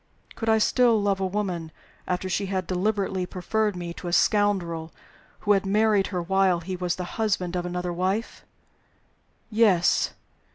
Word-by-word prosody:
Could 225 - -3
I 220 - +5
still 235 +1 +3
love 200 -1 +1
a 190 - 0
woman 180 -5 -3 0.4
after 180 +1 -1
she 195 +2 -1
had 190 -1 -2
deliberately 190 0 -1
preferred 210 +4 -1
to - - -9
me 175 -1 -5
a 175 - -3
scoundrel 175 -5 +1 0.5
who 210 - +1
had 195 -1 +4
married 205 0 +2
her 180 -3 -3
while 190 -1 +2
he 185 +2 -4
was 180 -1 -1
the 180 - -4 0.2
husband 185 -5 0
of 180 0 -2
another 180 0 -3
wife? 190 +6 -2 1.1
Yes! 210 -6 +3
190 Hz, 160 wpm, -25 LUFS, 180-205 Hz, 1.1 s, I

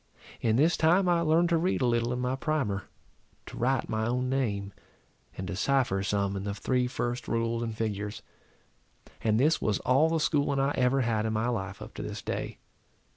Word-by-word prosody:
In 110 -1 +2
this 155 +7 +3
time 175 +4 +4
I 175 -1 +3
learned 170 +1 +3
to 170 -1 +3
read 180 -1 0
a - - +3
little 120 0 +1
in 125 - -1
my 125 +1 -1
primer, 135 -9 -1 0.6
to - - -10
write 130 +1 0
my 110 0 -1
own 125 +1 0
name, 100 -7 -1 0.6
and 95 - -4
to 95 - -4
cypher 120 -3 +1
some 100 0 0
in 95 - -4
the 100 0 -3
three 125 +3 0
first 120 0 -3
rules 115 0 0
in 115 -1 -3
figures. 105 -1 -3 1.0
And 110 0 +2
this 155 +5 +3
was 105 -2 +1
all 135 +6 +3
the 165 0 +1
schooling 145 -2 +1
I 135 +1 +2
ever 130 0 +2
had 110 -2 0
in 110 - -1
my 110 +2 0
life, 95 -6 -4
up - - -11
to - - -6
this - - -6
day. - - -4
120 Hz, 200 wpm, -29 LUFS, 110-140 Hz, 1.0 s, time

